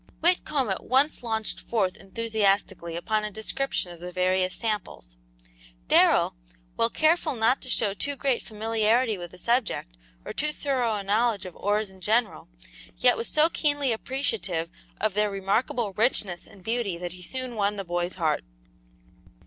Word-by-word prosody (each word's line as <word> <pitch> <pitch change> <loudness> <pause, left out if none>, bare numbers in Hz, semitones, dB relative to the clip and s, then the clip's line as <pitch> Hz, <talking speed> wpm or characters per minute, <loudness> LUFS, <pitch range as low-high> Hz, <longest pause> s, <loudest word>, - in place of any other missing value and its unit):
Whitcomb 305 - +2
at 190 - -3
once 270 +4 +2
launched 220 -2 -2
forth 200 -6 0
enthusiastically 195 -4 0
upon 215 +5 0
a 210 - -2
description 220 -1 -2
of 170 - -11
the 180 +1 -7
various 185 0 +1
samples. 75 - -4 0.7
Darrell, - - +5 0.4
while 230 - +2
careful 315 +1 +2
not 230 +3 +3
to 255 - -9
show 210 -4 +1
too 280 +8 -3
great 270 -3 0
familiarity 225 +1 +1
with 175 0 -6
the 180 - -13
subject, 235 - 0 0.3
or - - -5
too 300 +1 0
thorough 255 -7 0
a 205 - -3
knowledge 210 0 +1
of 180 - -8
ores 205 0 0
in 190 -1 -17
general, 220 +3 +1 0.5
yet - - +5
was 230 - -2
so 310 +1 +4
keenly 290 -5 +1
appreciative 205 -9 -2 0.3
of 215 -1 +1
their 210 +1 +2
remarkable 200 +2 0
richness 200 -5 0
and 195 - -16
beauty 225 -4 -1
that 175 0 -5
he 180 - -12
soon 255 +6 -4
won 205 -1 +1
the 195 -1 -4
boy's 175 +1 -2
heart. 160 -4 0
215 Hz, 160 wpm, -26 LUFS, 185-245 Hz, 0.7 s, Darrell